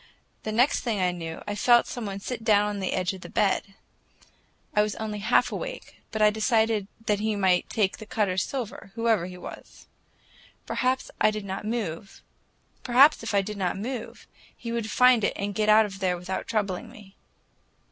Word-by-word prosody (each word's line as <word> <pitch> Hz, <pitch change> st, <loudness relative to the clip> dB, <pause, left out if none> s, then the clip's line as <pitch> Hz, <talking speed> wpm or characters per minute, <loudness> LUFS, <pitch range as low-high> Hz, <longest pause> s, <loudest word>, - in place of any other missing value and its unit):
The 215 Hz, -, -4 dB
next 245 Hz, +6 st, +3 dB
thing 225 Hz, -5 st, -2 dB
I 180 Hz, -1 st, +2 dB
knew, 165 Hz, -2 st, -6 dB
I 205 Hz, -, -2 dB
felt 240 Hz, +3 st, +4 dB
some 240 Hz, -4 st, -5 dB
one 195 Hz, 0 st, -5 dB
sit 230 Hz, +2 st, -5 dB
down 210 Hz, -2 st, +4 dB
on 205 Hz, -1 st, -3 dB
the 190 Hz, -, -2 dB
edge 185 Hz, +2 st, 0 dB
of 190 Hz, -, -10 dB
the -, -, -9 dB
bed. 195 Hz, -1 st, 0 dB, 1.0 s
I 210 Hz, -, +5 dB
was 210 Hz, 0 st, -1 dB
only 215 Hz, -1 st, -4 dB
half 205 Hz, -, +2 dB
awake, -, -, -6 dB
but 220 Hz, -1 st, 0 dB
I 210 Hz, -, +6 dB
decided 220 Hz, -1 st, +1 dB, 0.2 s
that 210 Hz, -2 st, +1 dB
he 215 Hz, 0 st, 0 dB
might 190 Hz, -3 st, +2 dB
take 205 Hz, -3 st, 0 dB
the 215 Hz, -, -9 dB
Cutters' 195 Hz, -4 st, 0 dB
silver, 240 Hz, -6 st, -5 dB
whoever 225 Hz, -6 st, +1 dB
he 180 Hz, 0 st, -9 dB
was. -, -, -11 dB, 0.8 s
Perhaps 255 Hz, +1 st, -1 dB
if -, -, -36 dB
I -, -, +6 dB
did 215 Hz, -1 st, -4 dB
not 195 Hz, +1 st, -5 dB
move, 205 Hz, -5 st, -4 dB, 2.3 s
he 230 Hz, -, -6 dB
would 230 Hz, -2 st, -2 dB
find 250 Hz, 0 st, +5 dB
it -, -, +1 dB
and 200 Hz, +1 st, -3 dB
get 215 Hz, +1 st, 0 dB
out 215 Hz, +1 st, +7 dB, 0.2 s
without 180 Hz, 0 st, -2 dB
troubling 210 Hz, 0 st, -2 dB
me. 210 Hz, -4 st, -15 dB
210 Hz, 170 wpm, -26 LUFS, 195-225 Hz, 2.3 s, out